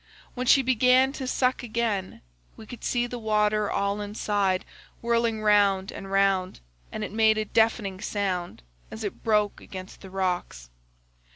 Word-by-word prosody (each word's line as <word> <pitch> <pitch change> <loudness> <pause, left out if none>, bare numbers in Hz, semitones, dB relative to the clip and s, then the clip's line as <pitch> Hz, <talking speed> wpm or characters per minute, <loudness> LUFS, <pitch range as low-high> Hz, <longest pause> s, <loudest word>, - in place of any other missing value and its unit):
When 250 0 -4
she 270 +2 +6
began 255 +1 +4
to 265 -3 -5
suck 255 0 +1
again, 220 -5 -2 0.4
we 220 - -11
could 240 +2 -11
see 240 -1 0
the 245 0 -6
water 210 -1 +1
all 200 +1 -1
inside 205 -2 -1 0.3
whirling 230 -2 0
round 200 -2 +3
and 195 0 -8
round, 195 -2 +1 0.3
and 215 - -4
it - - -5
made 220 0 +3
a 215 - -1
deafening 215 -3 +1
sound 185 - -3 0.3
as 220 - -8
it 205 - -6
broke 210 -2 +1
against 185 0 -10
the 190 - -10
rocks. 180 - -3
210 Hz, 155 wpm, -26 LUFS, 195-230 Hz, 0.4 s, she